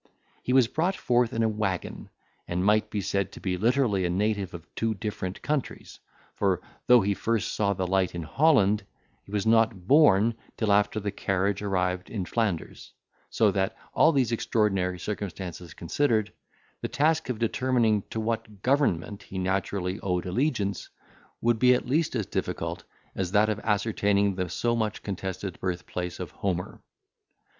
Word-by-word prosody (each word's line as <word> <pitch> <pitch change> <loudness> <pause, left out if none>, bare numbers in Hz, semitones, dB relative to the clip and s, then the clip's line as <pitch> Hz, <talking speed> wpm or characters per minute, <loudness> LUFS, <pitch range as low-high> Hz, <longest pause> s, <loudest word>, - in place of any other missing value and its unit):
He - - -3
was 130 -2 +5
brought 175 +9 0
forth 120 -6 +1
in 115 - 0
a - - +3
waggon, 105 -4 -3 0.4
and 90 +2 -1
might 105 +1 +3
be 105 - -2
said 100 0 -1
to - - -9
be 95 -2 -1
literally 110 -1 +2
a 90 - 0
native 100 +1 0
of 85 -1 -9
two 115 -1 -1
different 95 -2 -5
countries; 145 -3 -3 0.3
for, 95 -3 +1 0.3
though 125 -1 +7
he 100 +1 +1
first 115 +1 -1
saw 100 -1 +1
the 95 -1 -2
light 95 -1 +1
in 85 - -3
Holland, 105 - +3 0.4
he - - -17
was 105 0 -1
not 110 -4 +3
born 115 -6 +5 0.2
till 110 -3 +1
after 105 +1 +2
the 100 -1 -3
carriage 95 +1 -1
arrived 90 -2 -1
in 100 -5 -3
Flanders; 100 -6 -3 0.4
so 110 -3 +3
that, 95 0 -1 0.2
all 160 - +5
these 130 -6 +1
extraordinary 95 -5 0
circumstances 90 -3 -6
considered, 110 - 0 0.5
the - - -2
task 155 -1 +1
of 125 - -1
determining 115 -2 +1
to 110 - -3
what 110 -2 -3
government 115 - +1
he 95 - -9
naturally 95 0 -1
owed 90 -3 -1
allegiance, 105 - -1 0.5
would 120 -1 +2
be 125 +1 +6
at - - -2
least 150 +3 0
as 110 -4 0
difficult - - -3 0.3
as 95 -1 -3
that 105 +1 +4
of 105 -1 -1
ascertaining 105 -2 +1
the 90 -1 -3
so 120 +6 0
much 110 -2 -2
contested 95 -1 -5
birthplace 90 -1 -4
of 90 -3 -5
Homer. 90 -2 -3
105 Hz, 165 wpm, -27 LUFS, 95-115 Hz, 0.5 s, though